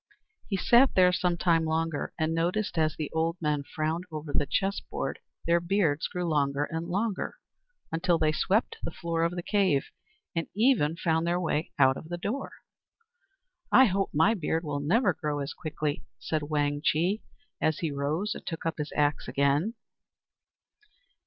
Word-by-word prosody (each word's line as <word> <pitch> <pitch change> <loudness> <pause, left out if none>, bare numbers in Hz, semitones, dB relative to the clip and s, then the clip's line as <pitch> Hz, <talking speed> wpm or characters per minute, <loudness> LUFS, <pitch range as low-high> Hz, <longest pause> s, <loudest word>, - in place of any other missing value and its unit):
He 195 - 0
sat 245 +7 +5
there 180 -1 +6
some 180 -1 +1
time 165 -2 +3
longer, 160 -1 -1
and 160 -1 0
noticed, 180 +6 0
as 155 -2 +1
the 155 - -4
old 165 +2 0
men 150 -2 0
frowned 160 +4 -3
over 155 -1 -6
the 145 - +1
chessboard, 195 +5 -2 0.3
their 170 0 +4
beards 170 -4 +1
grew 180 0 -3
longer 145 -3 +1
and 165 +1 -3
longer, 200 - -2 0.6
until 170 +1 +2
they 155 -1 +2
swept 200 +8 +1
the - - -3
floor 165 0 -3
of 170 +1 0
the 175 - -4
cave, 190 -10 +1 0.4
and 165 - -1
even 210 - +3
found 165 -2 +1
their 175 +1 +1
way 160 -2 -1
out 130 -1 +5
of 160 - -10
the 175 - -3
door. 225 +10 -3 1.2
"I 265 - +8
hope 195 -2 0
my 160 +9 +4
beard 165 -4 -1
will 145 -2 -2
never 180 - +2
grow 150 -1 -3
as 140 -1 -3
quickly," 150 -2 -3
said 155 -1 -2
Wang 145 -1 0
Chih, 180 +8 +1 0.4
as 155 -1 +2
he 160 -3 -2
rose 150 +9 -1
and - - -9
took 165 -2 -6
up 165 -1 -2
his 150 0 -3
axe 145 0 +1
again. 145 - +1
165 Hz, 170 wpm, -28 LUFS, 150-180 Hz, 1.2 s, I